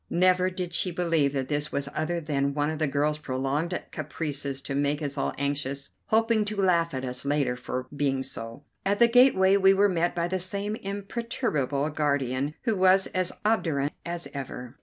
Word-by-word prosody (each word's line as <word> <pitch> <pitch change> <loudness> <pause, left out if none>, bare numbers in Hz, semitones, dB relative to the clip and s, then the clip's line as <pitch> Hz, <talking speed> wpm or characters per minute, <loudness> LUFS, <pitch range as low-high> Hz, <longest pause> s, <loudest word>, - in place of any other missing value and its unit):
Never 185 +1 +3
did 180 -1 -4
she 180 - +1
believe 165 -5 +1
that 135 -2 -2
this 145 +1 -1
was 140 0 -2
other 170 +2 -1
than 140 -3 -1
one 145 +1 +1
of 155 - -5
the 155 - +2
girl's 150 +2 0
prolonged 145 +6 -1
caprices 145 -3 -3
to 140 - -4
make 145 +1 +1
us 145 -3 -3
all 140 - -1
anxious, 140 -1 -2 0.2
hoping 225 0 +3
to 210 +1 -4
laugh 170 -5 +2
at 130 0 -3
us 125 0 -4
later 140 -2 +1
on 125 - -4
for 130 0 -4
being 135 -2 0
so. 115 0 -5 0.2
At 200 +1 +1
the 235 - +6
gateway 230 -6 +5
we 195 0 +5
were 200 +1 +4
met 175 -1 0
by 170 0 0
the 185 +1 -1
same 200 +3 -1
imperturbable 195 - -2
guardian, 140 -1 0
who 225 -4 +1
was 190 +1 +5
as 185 -1 0
obdurate 155 -10 +1
as 170 0 -4
ever. 130 -2 -6
155 Hz, 190 wpm, -27 LUFS, 140-185 Hz, 0.2 s, the